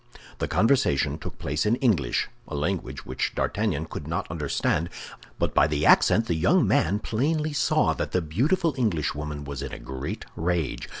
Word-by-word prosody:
The - - -1
conversation 80 - +2
took - - -7
place 75 +2 -1
in 110 +2 +3
English—a 100 - -1
language 75 -4 -3
which 65 0 -2
D'Artagnan - - 0
could 75 - -7
not 85 +2 -3
understand; 80 +1 0 0.5
but - - -1
by - - +5
the 75 -1 0
accent 115 - +5
the 90 - 0
young 110 - +3
man 95 -1 +2
plainly 150 +8 -1
saw 135 - +2
that - - -3
the 90 - +2
beautiful 150 - +1
Englishwoman 75 - -1
was 70 -2 -6
in 70 - -5
a - - -6
great 65 +1 -6
rage. 85 -4 -1
85 Hz, 165 wpm, -26 LUFS, 75-115 Hz, 0.5 s, by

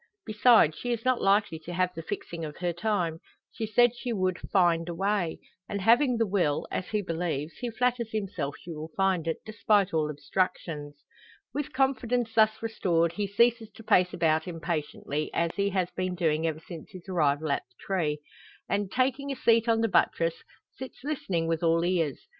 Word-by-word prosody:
Besides, 215 -7 +5
she 245 +9 -4
is 235 0 -2
not 255 -1 +2
likely 195 -4 +2
to 170 +2 -8
have 180 +1 +1
the 165 - -6
fixing 165 0 -5
of 150 -1 -6
her 175 -1 -1
time. 175 -4 -1 0.3
She 220 - -4
said 240 +2 +4
she 245 0 -4
would 185 -4 0
"find 175 -3 +3
a 170 - -4
way;" 195 -2 0 0.3
and 200 - -2
having 240 +5 +4
the 225 - +2
will 185 -8 0
as 185 - -3
he 210 -1 -1
believes 165 -3 -3
he 245 - -3
flatters 240 -1 0
himself 190 -9 -3
she 170 - -9
will 155 0 -6
find 190 -4 +1
it, 165 - 0
despite 210 -3 +2
all 155 -1 +1
obstructions. 150 -1 -3 0.5
With 290 0 -3
confidence 250 -3 0
thus 220 0 +3
restored, 170 -7 +1
he 200 +3 -2
ceases 230 +2 +2
to 225 - -12
pace 180 -4 +4
about 160 0 +1
impatiently, 155 -3 -3
as 170 0 +1
he 200 0 0
has 185 -2 -1
been 185 -1 -2
doing 160 -2 +1
ever 160 0 -3
since 170 0 -9
his 185 -3 -12
arrival 155 -4 +1
at - - +1
the - - -34
tree; 155 -6 -1 0.5
and, 200 -1 -1
taking 265 +2 0
a - - -2
seat 230 -1 +3
on 225 0 +3
the 225 - +3
buttress, 165 -4 +1 0.3
sits 260 +1 -9
listening 195 - -1
with 165 -1 -1
all 165 0 +3
ears. 165 -7 0
185 Hz, 190 wpm, -28 LUFS, 165-225 Hz, 0.5 s, Besides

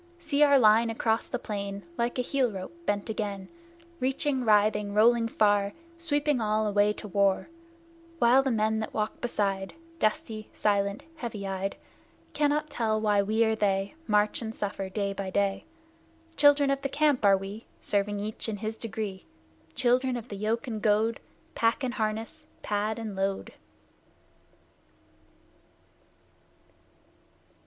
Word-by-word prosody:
See 315 -4 -1
our 285 -1 +7
line 225 -1 +5
across 225 0 0
the 245 - -2
plain, 200 -3 -5
Like 235 +5 -1
a 250 - +1
heel 255 -2 +1
rope 190 - -7
bent 205 -1 0
again, 205 -3 -4 0.5
Reaching, 265 +1 0
writhing, 210 -2 +3
rolling 230 +2 +4
far, 205 -2 +2 0.3
Sweeping 295 -5 0
all 215 0 +1
away 205 0 +3
to 210 - -8
war! 200 - +1 0.7
While 250 -1 +5
the 270 - -1
men 220 -2 +1
that 220 - -5
walk 215 0 -2
beside, 195 -4 -1 0.2
Dusty, 215 -1 -1
silent, 200 -1 0
heavy 225 -7 -5
eyed, 195 0 -3 0.6
Cannot 295 +1 +1
tell 220 -5 0
why 210 -2 +3
we 220 +3 +2
or 220 0 +1
they 195 -2 0
March 210 0 +2
and 225 0 -5
suffer 195 -2 -4
day 200 0 -2
by 195 -1 -4
day. 195 0 0 0.7
Children 290 -1 +5
of 275 0 -1
the 275 - -2
Camp 290 -3 +2
are 200 -1 +6
we, 195 +4 -8
Serving 205 0 -1
each 215 +2 -4
in 210 - -3
his 220 +2 -4
degree; 210 -4 -5 0.5
Children 250 +1 +2
of 240 +1 -8
the 205 - -5
yoke 215 +3 -1
and 220 -4 -4
goad, 220 +1 +2 0.3
Pack 230 +4 +1
and 250 -2 -1
harness, 225 +7 -3 0.2
pad 210 +1 -1
and 220 -3 -5
load! 195 0 -2
215 Hz, 145 wpm, -28 LUFS, 205-240 Hz, 0.7 s, our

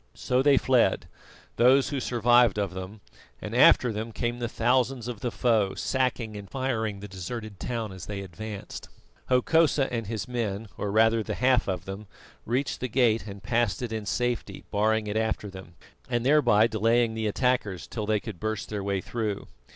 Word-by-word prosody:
So 125 +1 +1
they 140 0 +5
fled, 130 -3 +2 0.5
those 130 +3 +5
who 140 -2 -2
survived 120 -3 +3
of 100 -3 -1
them, 95 +3 -8 0.4
and - - -6
after 120 -3 +6
them 110 +2 -4
came 120 +2 -3
the 120 -1 -2
thousands 125 +1 +1
of 120 -4 -5
the 120 - -2
foe, 110 -5 +1
sacking 125 -4 -1
and 100 -1 -8
firing 110 -7 -2
the 105 - -7
deserted 100 +2 -7
town 115 -4 -3
as 95 -2 -9
they 100 -1 -4
advanced. 100 +2 -8 0.4
Hokosa 135 +1 +3
and 115 -3 -2
his 105 -2 -4
men, 115 -4 -3
or 105 - -3
rather 110 +1 +4
the - - -4
half 125 -1 +2
of 90 -2 -3
them, 95 +2 -7 0.4
reached 130 +4 -1
the 130 - -2
gate 115 -3 +2
and 100 0 -9
passed 120 -1 0
it 115 -2 -4
in 110 -2 -4
safety, 120 +1 -2
barring 110 +1 +1
it 105 +1 -2
after 110 -2 -1
them, 95 -2 -11 0.3
and 120 -1 -1
thereby 135 -7 +5
delaying 115 +1 +2
the 110 -1 -2
attackers 105 -5 0
till 110 -3 -5
they 110 -1 +2
could 100 -4 -8
burst 110 -1 -3
their 105 -2 -3
way 100 -1 -1
through. 110 -3 -3
110 Hz, 180 wpm, -27 LUFS, 105-125 Hz, 0.5 s, after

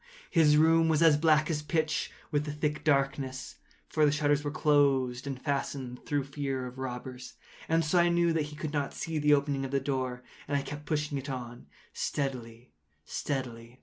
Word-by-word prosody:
His 155 -4 +5
room 165 +1 +5
was 160 0 +3
as 160 -2 +7
black 155 0 +3
as 150 -2 -1
pitch 155 0 -1 0.2
with 150 -1 +1
the 150 - -3
thick 150 +1 -2
darkness, 135 -2 0 0.3
(for 155 - +1
the 145 - +5
shutters 145 -1 +1
were 145 - -1
close 140 -5 +2
fastened, 135 -2 -3
through 145 -1 0
fear 135 -2 -3
of 125 +1 -9
robbers,) 125 0 -6 0.3
and 165 0 +2
so 175 +4 +3
I 175 0 +4
knew 170 -1 +3
that 160 -2 0
he 150 0 -9
could 155 0 -5
not 145 -2 -2
see 160 -2 -3
the 150 0 +5
opening 140 -1 -1
of 135 - -3
the 140 +1 +1
door, 130 -3 -2 0.2
and 145 0 +1
I 140 - -2
kept 145 +1 -8
pushing 150 -2 -1
it 135 +1 -7
on 120 -2 -6 0.3
steadily, 120 - -4 0.3
steadily. 120 -3 -4
145 Hz, 185 wpm, -30 LUFS, 130-150 Hz, 0.3 s, as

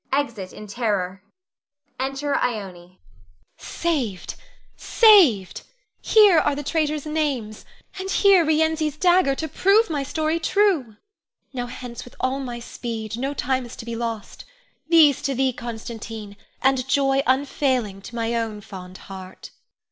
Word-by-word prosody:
[Exit 235 -9 -2
in 210 - -10
terror.] 200 -4 -2 0.8
[Enter 270 +2 -2
Ione. 245 -3 0 0.2
Ione. 175 +1 -20 0.6
Saved! 255 - -3 0.4
saved! 345 - +5 0.4
Here 415 -6 +6
are 290 - +1
the 290 - -5
traitors' 305 -1 -1
names, 280 -9 -2 0.3
and 380 0 -4
here 390 -2 +5
Rienzi's 315 -1 +1
dagger 350 -5 +3
to 315 - -4
prove 395 +6 +3
my 290 -2 -1
story 315 +3 -1
true. 335 - +1 0.6
Now 245 -2 -3
hence 245 -1 -8
with 245 - -15
all 260 +1 -1
my 245 -3 -5
speed, 225 -2 -6
no 275 +3 -2
time 260 -1 -1
is 240 - -10
to 230 - -9
be 235 -1 -5
lost! 230 -2 -5 0.5
These 315 -5 +6
to 275 0 -2
thee, 260 0 +1
Constantine, 225 -3 -7 0.3
and 265 -1 +2
joy 270 0 +2
unfailing 260 -6 0
to 235 - -10
my 230 0 -1
own 225 -3 -2
fond 185 -2 -10
heart. 190 -1 -10
260 Hz, 140 wpm, -23 LUFS, 225-305 Hz, 0.8 s, Here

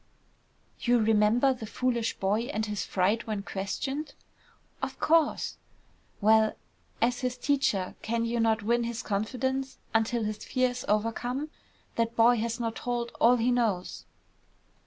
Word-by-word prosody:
"You 245 0 +3
remember 225 +4 +3
the 230 -4 -8
foolish 235 0 -1
boy 205 +4 0
and 220 -5 -1
his 210 -2 -3
fright 200 +5 +1
when 210 -2 -2
questioned?" 270 +11 -4 0.7
"Of 270 0 -4
course." 325 -1 +2 0.6
"Well, 220 +1 +4 0.5
as 245 +1 +2
his 250 -1 -2
teacher, 260 -9 0
can 230 +1 -1
you 235 +1 -1
not 225 -1 +2
win 235 +2 +1
his 235 -1 -4
confidence 260 +6 -2 0.2
until 225 +1 +1
his 215 0 -4
fear 255 -1 +1
is 245 0 -6
overcome? 240 +7 -1 0.5
That 230 0 0
boy 235 +1 +5
has 230 +1 -2
not 230 -1 -2
told 240 -1 -2
all 240 +2 +7
he 245 +1 +1
knows." 220 -7 -1
230 Hz, 140 wpm, -28 LUFS, 215-250 Hz, 0.7 s, all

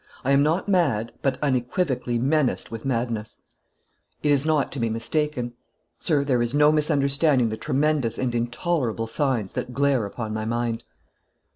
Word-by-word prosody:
I 135 - +2
am 140 0 +5
not 160 +7 +1
mad, 140 - +1
but 135 -2 0
unequivocally 130 -1 0
menaced 135 +1 0
with 115 +1 -7
madness; 115 -4 -2 0.8
it 150 - +3
is 140 +1 +2
not 155 -3 +2
to 140 - -5
be 115 -1 0
mistaken. 125 +2 -2 0.5
Sir, 150 -5 +1
there 130 -4 +1
is 120 +3 -1
no 150 +1 +6
misunderstanding 140 -4 +2
the 110 - -3
tremendous 145 -2 0
and 125 -2 -1
intolerable 120 0 -1
signs 115 -4 -1
that 125 - -4
glare 140 -5 +2
upon 110 +1 -5
my 110 0 -2
mind." 115 0 -2
130 Hz, 155 wpm, -24 LUFS, 115-150 Hz, 0.8 s, no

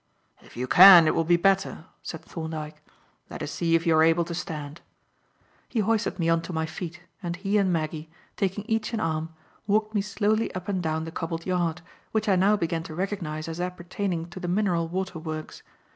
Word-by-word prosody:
"If - - -16
you 125 - -1
can, 180 +3 +10
it 155 - +3
will 165 - +1
be 170 +1 +3
better," 195 -2 +1 0.2
said 165 - -7
Thorndyke. 155 -2 -6 0.5
"Let - - -6
us - - -4
see 165 -1 +1
if 165 +1 +1
you 165 -1 +4
are 155 - +5
able 165 +1 +4
to 170 - -5
stand." 155 -3 -6 0.9
He 230 - 0
hoisted 225 +2 0
me 165 -3 0
on 165 0 +3
to 175 - -7
my 160 -1 -1
feet 175 +2 -7 0.2
and 170 -2 -3
he 195 +3 0
and 190 -2 +2
Maggie, 155 -1 -3 0.3
taking 195 +1 -2
each 225 0 -1
an 225 - -1
arm, 160 -2 -1 0.4
walked 215 +1 +1
me 205 - +2
slowly 210 +2 0
up 185 0 -5
and 190 -3 -1
down 160 -1 -1
the 165 - -6
cobbled 165 0 -4
yard, 180 -2 -1 0.3
which 220 -1 0
I 195 - +4
now 200 +3 +4
began 165 -2 -1
to 160 -1 -8
recognize 170 -5 -3
as 165 +1 -4
appertaining 180 -1 -3
to 185 - -8
the 180 - -4
Mineral 175 -3 +1
Water 185 0 -3
Works. 155 -1 -6
175 Hz, 205 wpm, -26 LUFS, 160-195 Hz, 0.9 s, can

